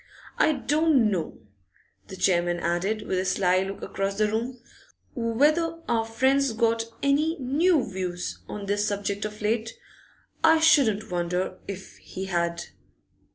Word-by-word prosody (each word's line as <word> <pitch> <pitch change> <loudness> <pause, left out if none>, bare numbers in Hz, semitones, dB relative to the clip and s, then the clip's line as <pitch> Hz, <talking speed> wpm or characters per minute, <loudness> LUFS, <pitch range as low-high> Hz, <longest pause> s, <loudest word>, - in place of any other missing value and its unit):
I 310 - +4
don't 290 -4 +2
know,' 170 - -3 0.7
the 190 - -8
chairman 175 -2 +1
added, 180 +6 -1
with 185 - -1
a - - 0
sly 185 -1 +2
look 195 +1 -5
across 195 0 -3
the 215 0 +3
room, 235 +3 -3 0.5
'whether 300 +8 +1
our 225 -1 +1
friend's 260 +3 +2
got 230 0 +1 0.2
any 300 +4 +2
new 290 +3 +2
views 185 -3 -4
on 205 -1 -6
this 205 +1 0
subject 205 0 -2
of 210 0 -7
late. 225 +1 0 0.7
I 320 0 +6
shouldn't 225 -10 +3
wonder 180 +1 -2
if 195 -1 -8
he 190 - -7
had. 170 -2 -1
215 Hz, 140 wpm, -26 LUFS, 190-265 Hz, 0.7 s, I